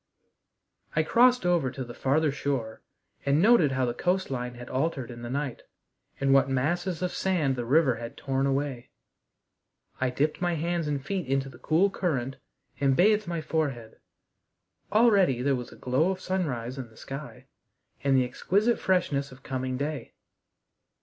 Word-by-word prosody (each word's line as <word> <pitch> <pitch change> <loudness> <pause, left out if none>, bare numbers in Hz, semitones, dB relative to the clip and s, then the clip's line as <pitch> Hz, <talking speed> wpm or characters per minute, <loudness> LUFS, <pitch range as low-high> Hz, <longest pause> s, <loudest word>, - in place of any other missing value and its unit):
I 155 - +3
crossed 245 +6 +4
over 175 -7 +2
to 130 +1 -5
the 120 -1 -9
farther 145 +4 +1
shore 135 -6 -3 0.4
and 140 +2 +2
noted 185 - +5
how 130 -1 +1
the 120 - -1
coast 180 +5 0
line 125 -1 -3
had 120 0 -9
altered 135 -2 -2
in 120 0 -9
the 120 - -6
night, 140 -1 -3 0.6
and 135 0 +3
what 135 0 +4
masses 160 +6 -1
of 180 - 0
sand 165 -8 0
the 120 -2 -3
river 135 0 +3
had 115 0 -8
torn 135 0 0
away. 135 -3 -2 1.1
I 130 - +1
dipped 145 +6 -1
my 175 -1 +1
hands 170 0 -1
and 140 -2 -2
feet 190 -4 -2
into 135 0 0
the 125 -2 -14
cool 170 +9 +2
current, 135 -9 -2 0.4
and 135 -1 +3
bathed 210 +3 +4
my 170 -2 -2
forehead. 140 -8 -3 0.9
Already 200 - +4
there 140 0 +2
was 125 -1 -6
a - - -12
glow 130 +8 +1
of 190 -1 -2
sunrise 140 -10 -2
in 125 -3 -6
the 110 - -21
sky 140 +2 -8 0.6
and 135 -1 +3
the 130 - +3
exquisite 205 - +1
freshness 145 -7 0
of 130 +1 -15
coming 130 -1 -3
day. 145 -2 -4
140 Hz, 170 wpm, -27 LUFS, 130-175 Hz, 1.1 s, noted